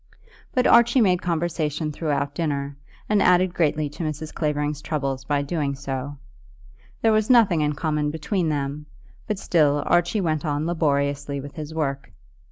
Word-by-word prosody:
But 250 - +1
Archie 235 +2 +5
made 185 -5 +3
conversation 160 -3 -1
throughout 145 -2 -2
dinner, 140 -3 -2 0.3
and 210 -1 +2
added 180 0 +4
greatly 155 -3 +1
to 150 +4 -7
Mrs. 155 0 -4
Clavering's 150 -1 -1
troubles 135 -4 -3
by 145 0 0
doing 140 -2 -2
so. 135 0 -5 0.9
There 225 - +5
was 215 +1 +2
nothing 220 -10 +5
in 150 0 +1
common 150 0 -1
between 160 +3 -1
them, 145 0 -3 0.4
but 210 - -1
still 145 -6 +2
Archie 175 +5 +2
went 155 -4 -1
on 150 -1 -1
laboriously 140 -3 0
with 140 +1 -8
his 155 -2 -6
work. 140 -4 -3
150 Hz, 155 wpm, -23 LUFS, 145-175 Hz, 0.9 s, Archie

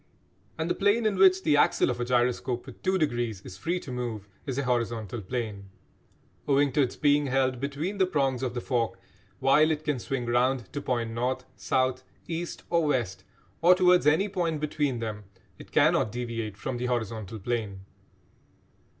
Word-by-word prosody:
And 160 0 -1
the 175 - +1
plane 205 +3 +2
in 210 -2 +2
which 190 0 +5
the 150 - +3
axle 145 - +3
of 120 - -5
a 120 - -1
gyroscope 125 0 0
with 130 - -12
"two 190 0 +1
degrees" 120 - -1
is 95 - -10
free 170 - -2
to 130 - -8
move 120 -5 -4 0.2
is 135 -2 -3
a 140 - 0
horizontal 115 -3 -1
plane. 105 -2 -4 0.8
Owing 140 0 +3
to 145 - +2
its 130 - 0
being 145 0 +3
held 130 -1 +1
between 145 +9 -3
the 190 - +4
prongs 135 -7 0
of 125 -2 -2
the 120 - -2
fork, 120 -4 -1 0.4
while 150 +4 +4
it 155 -1 -1
can 150 -5 -1
swing 125 +1 -3
round 125 +1 +1
to 145 - -3
point 120 -4 -1
north, 125 +2 -2
south, 130 0 0 0.2
east 170 +1 -4
or 170 -2 +3
west, 120 -10 -1 0.4
or 175 +2 +7
towards 180 -3 +4
any 160 +7 +4
point 175 -6 -1
between 145 -3 -1
them, 105 -2 -5 0.3
it - - -13
cannot 110 - +3
deviate 115 -3 -4
from 125 +4 -4
the 125 +1 -2
horizontal 110 -3 -3
plane. 105 -3 -3
130 Hz, 180 wpm, -27 LUFS, 120-150 Hz, 0.8 s, or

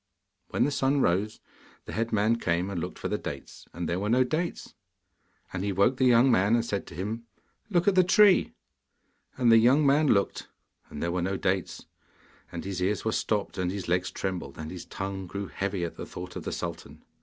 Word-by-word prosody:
When - - 0
the 145 - +1
sun 140 0 +1
rose, 100 +4 +1 0.5
the - - -7
head 115 +1 -1
man 110 +2 +2
came 90 -1 -1
and 90 -4 -3
looked - - -5
for - - -4
the - - -2
dates, - - -8
and 85 -1 -4
there 85 +3 -1
were 105 +2 -2
no 125 +3 +4
dates. 160 +7 -3 0.8
And 95 0 -3
he 100 - 0
woke 100 +7 +2
the 130 - +2
young 125 +2 +5
man, 100 +1 +4
and 115 -1 +1
said 100 -3 -3
to 85 - -10
him, 110 +6 -4 0.4
'Look 180 -3 +1
at 200 - +5
the 185 0 +5
tree.' 195 +2 +5 0.8
And 120 -2 +4
the 115 - +8
young 130 +6 +4
man 145 +2 +4
looked, 100 -6 +1 0.4
and 75 - -6
there 85 - 0
were 90 0 -1
no 95 +2 -1
dates. 95 -1 -2 0.7
And 85 - -6
his 95 -2 -4
ears 100 +4 0
were 110 - +1
stopped, 105 -3 -1
and 90 -1 0
his 95 0 -5
legs 90 +1 +1
trembled, 90 -8 -4
and 80 0 -6
his 90 -1 -8
tongue 95 -1 -5
grew 100 +3 -4
heavy 100 -2 -3
at 85 - -7
the - - -6
thought 90 0 -8
of - - -6
the - - -3
sultan. - - -6
100 Hz, 215 wpm, -28 LUFS, 90-120 Hz, 0.8 s, the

